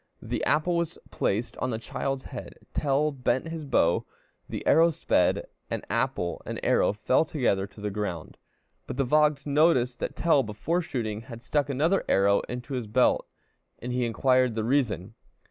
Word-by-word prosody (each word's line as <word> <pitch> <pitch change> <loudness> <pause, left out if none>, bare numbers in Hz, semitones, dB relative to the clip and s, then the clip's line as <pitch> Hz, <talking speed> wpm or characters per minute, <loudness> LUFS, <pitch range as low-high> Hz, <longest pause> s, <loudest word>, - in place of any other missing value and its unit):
The - - -3
apple 155 +4 +2
was 170 0 -2
placed 110 +5 -1
on 130 - -1
the 115 - -2
child's 130 +4 -3
head, - - -8 0.2
Tell 145 +2 +1
bent 130 +2 -1
his 165 -2 -5
bow, 85 -11 +2 0.5
the - - -5
arrow 165 +1 +6
sped, 160 - +1 0.2
and - - -4
apple 85 0 -1
and - - -5
arrow - - +3
fell 110 +7 +2
together 120 -11 0
to 100 +1 -17
the 105 0 -3
ground. 95 -6 -4 0.5
But - - -5
the 135 - +2
Vogt 150 +2 +2
noticed 140 -5 +3
that - - -3
Tell, 160 -4 +3
before 130 +10 -1
shooting, 110 -9 -3
had 115 -1 -10
stuck 145 +1 0
another 155 +8 +2
arrow 100 +1 +4
into 125 +3 -5
his 125 -4 -3
belt, 125 +4 +2 0.5
and 125 +1 -5
he 125 0 0
inquired 125 +1 +2
the 110 - -1
reason. 115 -6 0
125 Hz, 170 wpm, -27 LUFS, 110-150 Hz, 0.5 s, arrow